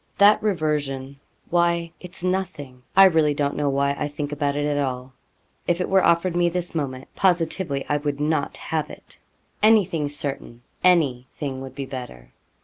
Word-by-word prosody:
'That 205 +1 +6
reversion! 145 -8 -2 0.3
Why 170 -1 +1
it's 180 0 -11
nothing 175 -9 -3 0.2
I 195 - +10
really 160 -5 +3
don't 145 0 -1
know 145 -1 0
why 140 +1 +1
I 150 - -2
think 145 0 -5
about 145 -1 -1
it 145 0 0
at 145 -1 0
all. 130 -1 -3 0.5
If 175 0 +1
it 180 - -1
were 190 0 +4
offered 170 +1 +2
me 175 0 +3
this 175 0 -3
moment, 135 -5 -3
positively 170 -5 +1
I 150 - +1
would 145 -1 -3
not 150 -1 -1
have 155 -3 -3
it. - - -13 0.4
Anything 195 -9 +3
certain 140 -4 -6 0.2
any 145 -9 +3
thing 135 -4 -5
would 130 -1 -9
be 140 -1 -4
better.' 125 - -9
150 Hz, 170 wpm, -23 LUFS, 140-175 Hz, 0.5 s, I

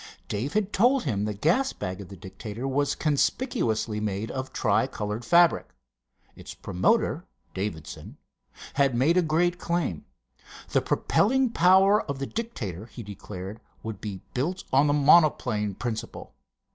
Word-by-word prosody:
Dave 115 +8 -3
had 210 -1 0
told 250 +6 +3
him 105 - -1
the 105 - -2
gas 175 - +1
bag 90 +1 -5
of 95 - -10
the 100 - -10
Dictator 105 +5 -7
was 145 +1 0
conspicuously 135 - 0
made 105 0 -3
of 130 0 -5
tri - - +1
colored 105 +3 -4
fabric. 170 - +3 0.6
Its - - -10
promoter, 90 -1 +1 0.3
Davidson, 95 -7 -6 0.6
had 140 -3 +2
made 140 +8 +3
a 180 - +5
great 175 +2 +1
claim. 170 - -2 0.6
The - - +2
propelling 255 +4 +2
power 190 +3 +5
of 140 - -5
the 135 - -3
Dictator, 115 - -5
he 120 - -9
declared, 100 0 -8 0.2
would 110 -4 -6
be 100 -3 -6
built 170 +9 -2
on 140 +3 +5
the 145 - +3
monoplane 140 - +3
principle. 115 0 -5
130 Hz, 145 wpm, -26 LUFS, 105-175 Hz, 0.6 s, a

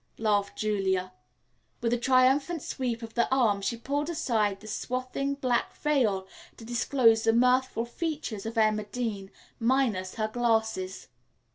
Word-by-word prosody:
laughed 205 -2 0
Julia. 190 -3 0 0.7
With 235 0 0
a - - +2
triumphant 265 +6 +3
sweep 240 -3 -3
of 225 0 -8
the 235 - +1
arm, 225 -7 +3
she 235 +4 -2
pulled 285 +6 -2
aside 220 - 0
the 215 - -15
swathing 255 +5 -3
black 255 -3 -1
veil, 225 -11 +1 0.3
to 225 - -11
disclose 235 -1 +3
the 225 - +3
mirthful 250 0 +2
features 255 - -4
of 225 +1 -6
Emma 215 -1 +2
Dean, 210 -4 -4 0.3
minus 230 -7 +1
her 215 -1 -1
glasses. 220 -5 -1
230 Hz, 140 wpm, -28 LUFS, 215-255 Hz, 0.7 s, triumphant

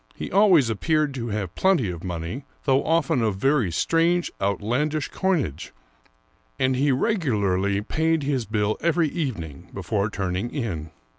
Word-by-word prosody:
He - - -6
always 180 - +5
appeared 155 +5 +1
to 120 -3 -4
have 100 -5 -3
plenty 170 - +2
of 85 -1 -8
money, 90 - -4 0.2
though 135 0 +3
often 160 -4 +1
of 110 -3 +1
very 130 - +1
strange, 165 - +1
outlandish 125 +10 0
coinage, 150 - -1 0.8
and 130 0 +1
he 140 +2 +2
regularly 100 - +1
paid 160 +5 0
his 135 -4 -1
bill 105 -1 0
every 170 -1 +2
evening 90 - -5
before 100 +2 -1
turning 95 +2 -2
in. 90 - -4
125 Hz, 140 wpm, -24 LUFS, 100-155 Hz, 0.8 s, always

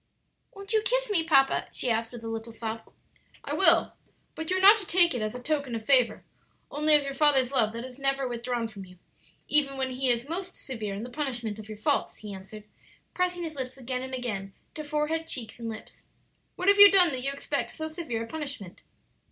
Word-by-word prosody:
"Won't 395 +1 -6
you 435 - +3
kiss - - 0
me, 345 -5 +3
papa?" 275 -4 +3
she 250 - -1
asked, 225 0 -1
with 240 -2 -10
a - - -6
little 225 +1 -5
sob. 225 0 -6 0.5
"I - - -4
will; - - +4 0.4
but 320 0 -6
you 370 - +1
are - - 0
not 400 +3 +8
to 400 -4 -5
take 345 -2 +5
it 245 - -3
as 215 +2 -3
a - - -5
token 285 -2 -2
of 220 -1 -6
favor; 255 -3 +3 0.5
only 300 +1 +4
of 295 - +4
your 275 0 -4
father's 275 -3 +3
love 225 -6 +2
that 230 +2 -6
is 260 +1 -11
never 275 -1 0
withdrawn 240 -1 -3
from 210 -3 -10
you, 180 -1 -15 0.5
even 280 -2 +1
when 260 -1 -2
he 255 +1 -1
is 240 +2 +1
most 365 +3 -5
severe 215 -7 -5
in 205 - -6
the 245 - -8
punishment 240 -7 -4
of 215 0 -11
your 215 - -7
faults," 215 - -1
he 210 -2 -8
answered, 195 +2 -10 0.5
pressing 360 -1 -1
his 315 -2 -5
lips 260 0 -5
again 255 0 -4
and 260 0 -5
again 200 -6 -4 0.2
to 305 - -6
forehead, 305 +2 -2
cheeks, 240 -6 -4
and 230 -1 -5
lips. 220 0 -10 0.5
"What 365 - -4
have 400 0 +5
you 405 0 +12
done 370 -3 +6
that 260 -4 -2
you 275 +2 -1
expect 280 - -2
so 315 -1 -6
severe 310 -8 -4
a - - -8
punishment?" 280 - -7
260 Hz, 225 wpm, -27 LUFS, 230-315 Hz, 0.5 s, you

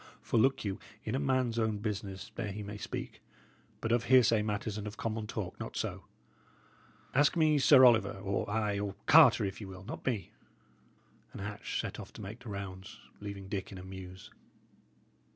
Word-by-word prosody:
For 115 - +1
look 130 0 +3
you, 95 -1 -2 0.2
in 110 - -3
a 130 - +1
man's 130 -4 +1
own 110 -2 +1
business 100 -2 -4
there 110 -2 -3
he 105 +2 -5
may 105 +1 -7
speak; - - -6 0.6
but 115 - -1
of 120 0 +2
hearsay 120 -4 +5
matters 105 0 -2
and 105 0 -5
of 105 +1 -7
common 110 -1 -3
talk, 105 -4 -5
not - - -6
so. - - -3 1.1
Ask 145 +4 +4
me 155 -2 +4
Sir 135 -1 +8
Oliver 110 -5 +4 0.3
ay, 105 -1 0
or 100 -1 -3
Carter, 135 -9 +7
if 95 +2 -5
ye 100 - -6
will; 95 0 -10
not 115 - -7
me." 110 -7 -1 1.0
And - - -7
Hatch 105 0 -4
set - - -4
off - - -9
to - - -9
make 105 +5 -7
the 125 -2 -10
rounds, 100 0 -7 0.2
leaving 100 -2 -7
Dick 95 0 -4
in 95 - -8
a 90 - -8
muse. 95 -1 -9
105 Hz, 185 wpm, -32 LUFS, 100-115 Hz, 1.1 s, Sir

